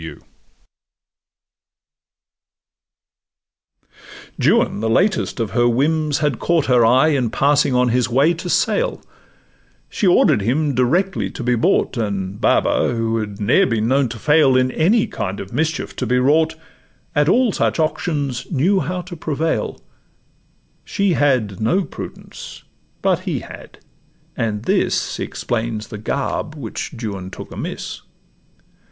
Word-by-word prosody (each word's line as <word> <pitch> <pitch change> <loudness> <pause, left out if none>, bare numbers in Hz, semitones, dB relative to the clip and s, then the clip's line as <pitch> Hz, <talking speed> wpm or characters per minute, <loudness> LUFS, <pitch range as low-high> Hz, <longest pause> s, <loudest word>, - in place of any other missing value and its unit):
Juan, - - +2
the 110 +1 -1
latest 130 - +1
of 115 -3 -2
her 120 -1 +2
whims, 150 +4 +1
had 150 -5 -1
caught 165 -4 +1
Her 125 -2 +4
eye 130 +7 +4
in 130 -6 +1
passing 140 +2 +2
on 125 0 +3
his 125 +1 +1
way 140 +7 +3
to 175 +2 -6
sale; - - 0 0.9
She 210 - -1
order'd 175 - +4
him 140 +7 0
directly 170 +11 +1
to 130 - -7
be 125 +1 +1
bought, 120 +2 +1
And 100 -3 -3
Baba, 120 - +2
who 115 0 -1
had 105 -2 -5
ne'er 125 - +3
been 110 -1 0
known 135 0 +2
to 120 - -7
fail 150 0 +4
In 130 0 +2
any 205 - +2
kind 95 0 -4
of 95 - -8
mischief 160 +1 -2
to - - -2
be 125 - +2
wrought, 155 +5 +2 0.6
At 150 +1 +2
all 245 +2 +3
such - - 0
auctions 150 -5 -2
knew 175 +7 +2
how 180 0 -3
to 180 -1 -9
prevail: 160 0 -2 1.0
She 200 -3 0
had 125 - +1
no 180 - +2
prudence, - - -10 0.4
but - - +2
he - - -2
had; - - -12 0.6
and 105 -2 -2
this - - 0
Explains 110 -2 -3
the 105 - -7
garb 140 +7 -3
which 125 -8 -5
Juan 100 -5 -5
took - - -10
amiss. - - -6
130 Hz, 135 wpm, -19 LUFS, 115-160 Hz, 1.0 s, Her